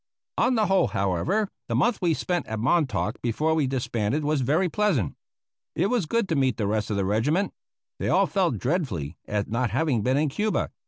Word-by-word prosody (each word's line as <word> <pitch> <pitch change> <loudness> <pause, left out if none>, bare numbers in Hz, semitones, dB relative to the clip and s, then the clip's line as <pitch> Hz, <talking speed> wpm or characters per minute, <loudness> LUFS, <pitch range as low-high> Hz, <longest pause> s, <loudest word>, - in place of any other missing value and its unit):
On 255 - +3
the 220 -2 +3
whole, 190 -2 +3
however, 100 - 0 0.2
the - - -1
month 240 -2 +2
we 170 -3 +2
spent 175 +2 -2
at 110 - -3
Montauk 125 - 0
before 150 +7 0
we 155 -4 +1
disbanded 125 +1 -1
was 150 -1 +1
very 155 +9 +2
pleasant. 175 - 0 0.6
It 200 - +1
was 235 -10 +1
good 230 +1 0
to 165 - +1
meet 130 -4 +1
the 105 - -1
rest 105 +1 -1
of 105 - -1
the 100 - 0
regiment. 140 - +1 0.5
They - - -1
all - - +4
felt 185 -4 0
dreadfully 95 - -2
at 105 -1 -1
not 120 +2 0
having 130 0 +1
been 130 +5 +1
in 150 0 +2
Cuba. 210 +9 -1
140 Hz, 200 wpm, -25 LUFS, 110-180 Hz, 0.6 s, all